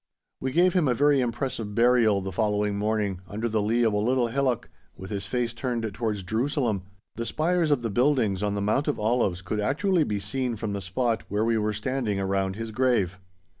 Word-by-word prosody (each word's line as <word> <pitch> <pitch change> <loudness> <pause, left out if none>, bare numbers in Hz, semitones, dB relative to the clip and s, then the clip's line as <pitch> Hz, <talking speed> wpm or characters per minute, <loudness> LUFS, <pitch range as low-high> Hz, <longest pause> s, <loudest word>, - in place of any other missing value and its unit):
We 130 - -2
gave 175 +5 +4
him 175 -6 +2
a 125 - +2
very 145 +1 +4
impressive 120 -3 -3
burial 115 -4 +4
the 95 0 -4
following 105 0 0
morning, 105 -3 -1
under 110 +5 -3
the 110 -2 0
lea 115 +4 +2
of 110 -2 +2
a - - +1
little 120 +2 +1
hillock, 130 -2 0 0.3
with 95 +2 -9
his 100 -1 -4
face 120 +1 -1
turned 120 -2 -2
towards 105 -2 -2
Jerusalem; 115 - 0 0.4
the 115 - -2
spires 170 +1 +1
of 140 -5 +2
the 115 - -1
buildings 120 -5 +2
on 105 -1 0
the 100 - -1
Mount 120 +9 +1
of 150 - 0
Olives 105 -5 +1
could 105 +3 -2
actually 160 - +2
be 105 -7 -2
seen 120 +4 -2
from 105 -1 -4
the 100 - -3
spot 110 +4 -1
where 105 +2 0
we 115 0 +2
were 105 0 0
standing 105 -1 -2
around 95 0 0
his 115 +1 -5
grave. 110 -7 +1
115 Hz, 205 wpm, -26 LUFS, 105-130 Hz, 0.4 s, gave